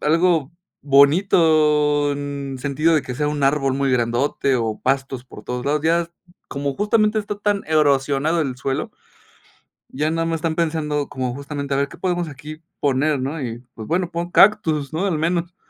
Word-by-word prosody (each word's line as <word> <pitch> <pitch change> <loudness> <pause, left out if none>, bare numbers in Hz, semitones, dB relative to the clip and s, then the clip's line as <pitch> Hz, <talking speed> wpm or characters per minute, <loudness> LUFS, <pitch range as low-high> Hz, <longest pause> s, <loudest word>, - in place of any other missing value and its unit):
algo 165 -2 +2 0.3
bonito, 150 -1 +4
mm, 140 - -5 0.3
en 135 - -6
sentido, 150 +5 +1
de 155 - +3
que 125 - -6
sea 150 +3 -1
un 150 -1 -3
árbol 135 -1 +2
muy 140 0 0
grandote, 125 +2 +1
o 110 -2 -2
pastos 135 -1 -1
por 105 -4 -13
todos 125 0 -4
lados. 150 +1 +1
Ya 165 +2 +3
es 165 - -10
m 170 - -44 0.3
como 140 -1 -3
justamente 215 +1 +2
está 205 -1 -4
tan 205 -1 0
erosionado 145 +1 +2
el 130 -3 -3
suelo, 135 +1 -3 1.0
ya 150 +4 -1
nada 165 0 -1
más 165 0 -1
están 160 0 -2
pensando 155 -3 -1
como, 130 -1 -3
justamente, 140 0 -5
a - - +1
ver 140 +1 0
qué - - -13
podemos 175 -3 -1
aquí 150 +3 -10 0.2
poner, 145 +1 +1
¿no?, 140 +5 -3
y 115 -2 -4 0.2
pues, 110 -1 -8
bueno, 175 +1 -1
pon 170 +1 -4
cactus, 160 -10 +3
¿no?, 175 +5 -1
al 165 -5 0
menos. 170 +2 -1
150 Hz, 185 wpm, -21 LUFS, 135-165 Hz, 1.0 s, bonito